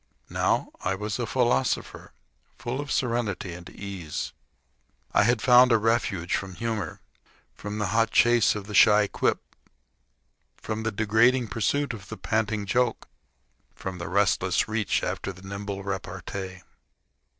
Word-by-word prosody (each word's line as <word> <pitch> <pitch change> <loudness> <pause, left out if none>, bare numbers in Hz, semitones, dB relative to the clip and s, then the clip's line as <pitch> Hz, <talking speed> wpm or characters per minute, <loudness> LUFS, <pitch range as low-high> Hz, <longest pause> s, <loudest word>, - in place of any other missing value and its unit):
Now - - +1
I 95 +1 0
was 105 +2 -4
a 120 - -1
philosopher, 130 0 0 0.5
full 125 +4 -3
of 145 - -7
serenity 115 -7 -1
and 85 +1 -10
ease. 95 -6 -6 0.8
I - - +5
had 115 +1 +2
found 125 0 +7
a 115 - +6
refuge 105 -6 0
from 95 -2 -4
humor, 115 -2 -3 0.5
from 105 +1 -6
the 105 - 0
hot 115 0 +3
chase 120 -2 +4
of 105 -2 -5
the 105 - -8
shy 105 +1 +6
quip, - - 0 1.1
from 110 0 -4
the 110 0 -1
degrading 110 +3 +3
pursuit 125 +5 0
of 105 -2 -10
the - - -6
panting 110 -2 -1
joke, 120 +3 0 0.7
from 95 -1 -6
the 85 - -5
restless 95 -1 +2
reach 110 -1 0
after 100 - -3
the 95 +1 -13
nimble 100 0 -5
repartee. 95 -1 -5
105 Hz, 140 wpm, -26 LUFS, 95-115 Hz, 1.1 s, found